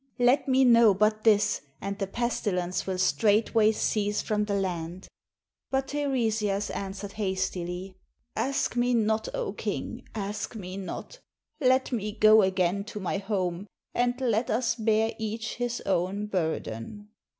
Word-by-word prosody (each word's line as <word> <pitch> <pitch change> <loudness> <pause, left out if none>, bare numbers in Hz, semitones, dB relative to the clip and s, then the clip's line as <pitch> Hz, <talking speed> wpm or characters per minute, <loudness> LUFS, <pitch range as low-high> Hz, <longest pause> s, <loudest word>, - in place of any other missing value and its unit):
Let 250 +4 +3
me 265 0 +4
know 230 -4 +6
but 215 +2 +2
this, 210 -1 +3 0.2
and 200 +1 -4
the 195 - -1
pesti 235 0 -1
lence 180 +1 -2
will 190 -1 -1
straightway 210 - +3
cease 210 -1 0
from 210 -1 0
the 205 -1 -1
land." 180 -2 -3 0.6
But 270 0 -1
Teiresias 225 -8 0
answered 195 0 -5
hastily, 185 -1 -3 0.4
"Ask 270 -2 0
me 245 0 +2
not, 220 -1 +1
0 - - -2
king, - - -4
ask 205 +2 -4
me 185 -3 -6
not. 195 - -7 0.4
Let 260 -2 +3
me 210 -3 -2
go 215 0 +6
again 190 0 +1
to 210 - -7
my 190 0 -2
home, 190 -2 -2 0.3
and 245 +1 +1
let 235 -2 +1
us 230 +2 +1
bear 220 -1 +1
each 220 0 -4
his 245 0 -2
own 190 +2 0
burden." 175 - -3
210 Hz, 145 wpm, -27 LUFS, 190-230 Hz, 0.6 s, know